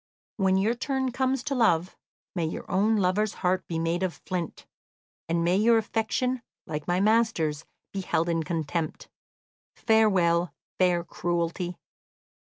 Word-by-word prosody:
When 190 -2 +3
your 210 +4 +2
turn 265 +1 -1
comes 260 0 0
to 280 - -2
love, 185 -9 +2 0.4
may 170 -3 -1
your 160 - -4
own 205 +4 +3
lover's 200 +1 +1
heart 185 +1 +1
be 165 - -3
made 165 +2 0
of 185 -3 -1
flint, 180 -4 -4 0.6
and 170 0 +1
may 175 +2 +3
your 230 +2 +5
affection, 225 +3 -1 0.2
like 150 -3 -5
my 175 +1 +2
master's, 200 -8 +2 0.3
be 195 - -2
held 170 -2 0
in 165 -1 +1
contempt! 160 0 -3 0.7
Farewell, 180 -6 +3 0.2
fair 180 -2 +3
cruelty!" 175 +1 -2
185 Hz, 140 wpm, -27 LUFS, 170-220 Hz, 0.7 s, your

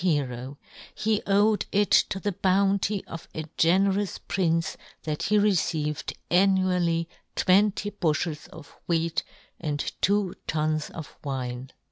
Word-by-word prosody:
hero; 135 -5 -1 0.4
he 215 -1 +1
owed 205 +2 +3
it 205 0 +2
to 190 - +4
the 205 - 0
bounty 195 +2 +1
of 165 - -8
a 155 - -3
generous 195 +3 +2
prince 165 -3 0 0.3
that 150 -1 -3
he 210 - +2
received 160 -7 +1 0.2
annually 180 -3 +3 0.3
twenty 205 +2 +3
bufhels 160 -5 -1
of - - -13
wheat 165 -1 +1 0.4
and 150 -3 -3
two 200 -1 +2
tuns 155 0 0
of 160 -3 -9
wine 130 -2 -4
175 Hz, 120 wpm, -26 LUFS, 155-200 Hz, 0.4 s, to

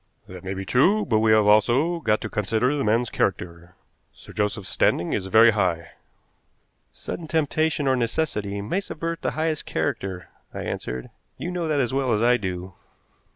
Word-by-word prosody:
"That 90 -1 -10
may 95 +1 -4
be 95 0 -5
true, 190 - +3
but 110 - +2
we 110 0 +3
have 110 -1 +5
also 125 +11 +3
got 110 -8 +1
to - - -3
consider 110 +6 0
the 140 - -1
man's 115 +2 +1
character. 85 -1 -2 0.4
Sir - - -15
Joseph's 105 -1 -2
standing 85 - +1
is 95 -2 -2
very 110 +3 +6
high." 90 -6 -1 1.0
"Sudden 165 - -7
temptation 155 -1 0
or 130 - +3
necessity 115 -6 -2
may 150 - -1
subvert 165 -3 -5
the - - 0
highest 155 -1 -1
character," 95 -9 -3 0.3
I - - -4
answered. 60 0 -5 0.3
"You 175 - -4
know 175 -2 -2
that 150 -2 +1
as 125 -2 0
well 135 -2 +1
as 105 - +1
I 125 +1 +4
do. 95 -3 -5
110 Hz, 175 wpm, -24 LUFS, 95-145 Hz, 1.0 s, very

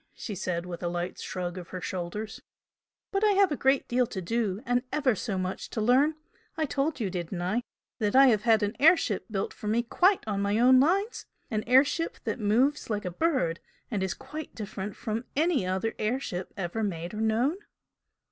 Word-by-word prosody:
she 215 - -6
said, 180 -2 -2
with 175 -1 -7
a 175 - -1
light 175 +1 -3
shrug 180 0 -4
of 175 - -9
her 185 - -6
shoulders 185 +5 -5 0.7
"But 390 +1 0
I 420 -1 +5
have 390 -3 +4
a - - +1
great 270 0 +2
deal 245 0 +2
to 190 - -5
do, 205 +1 -1
and 245 0 +2
ever 280 -5 +2
so 200 0 -3
much 185 0 -3
to - - -4
learn. 260 +8 +4 0.4
I 315 - +1
told 285 +1 -1
you, 205 -5 -1
didn't 175 0 -4
I? 210 +7 0 0.4
that 210 -1 0
I 270 +1 +9
have 215 -4 +3
had 225 -1 +4
an 205 +3 -1
air 325 +5 +7
ship 210 -10 -2
built 195 -3 -2
for 210 - -8
me 225 +3 +2
quite 365 - +3
on 200 -2 -1
my 200 +1 +1
own 255 +2 +6
lines? 395 - +1 0.2
an 215 -1 0
air 255 +3 +7
ship 330 +3 -2
that - - -2
moves 240 +8 +2
like 210 -2 -2
a 180 - -2
bird 180 - 0 0.3
and 205 -4 -1
is 190 -2 -1
quite 310 0 -8
different 205 -2 -5
from 225 0 -3
any 300 - +2
other 190 +4 -1
air 225 +5 0
ship 180 -8 -5
ever 190 +3 -3
made 175 -4 -3
or 215 - -3
known?" 240 - +1
220 Hz, 210 wpm, -28 LUFS, 190-270 Hz, 0.7 s, I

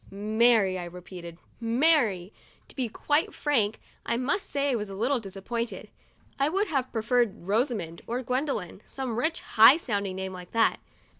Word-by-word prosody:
' - - -21 0.3
Mary," 220 -6 +4
I 175 - -5
repeated, 175 -1 -10 0.2
" - - -34 0.2
Mary." 230 - +3 0.4
To - - -14
be 255 -4 -1
quite 295 +7 0
frank, 225 -8 0 0.2
I 235 - -1
must 290 +11 -1
say 280 0 0
I - - +1
was 210 -3 -3
a 195 - -7
little 245 +6 +1
disappointed. 225 +4 -5 0.5
I 275 +2 +3
would 390 +5 0
have 270 -5 -1
pre 225 -2 -2
ferred 240 -3 +2
Rosamond, 200 - -1
or 245 +3 -2
Gwendolyn 250 - -2
— - - -32
some 260 -4 -2
rich, 320 +6 0
high 225 +6 +7
sounding 200 - -2
name 190 0 -4
like 180 -1 -10
that. 230 0 +3
230 Hz, 180 wpm, -27 LUFS, 195-265 Hz, 0.5 s, high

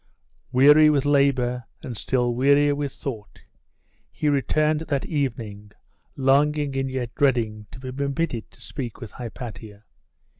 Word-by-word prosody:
Weary 145 +4 +7
with 145 -3 +2
labour, 135 -4 +2 0.2
and 120 - -6
still 120 +2 0
wearier 140 +3 +4
with 145 -1 -3
thought, 110 -8 -8 0.7
he 150 - -1
returned 150 +2 +1
that 145 -4 -2
evening, 110 -8 -4 0.4
longing 140 +1 +2
and 135 0 -1
yet 125 -2 -4
dreading 115 -6 0
to - - -11
be 130 0 -6
permitted 140 -4 -2
to - - -22
speak 125 -6 -6
with 115 -5 -8
Hypatia. 110 -3 -8
130 Hz, 135 wpm, -24 LUFS, 120-145 Hz, 0.7 s, Weary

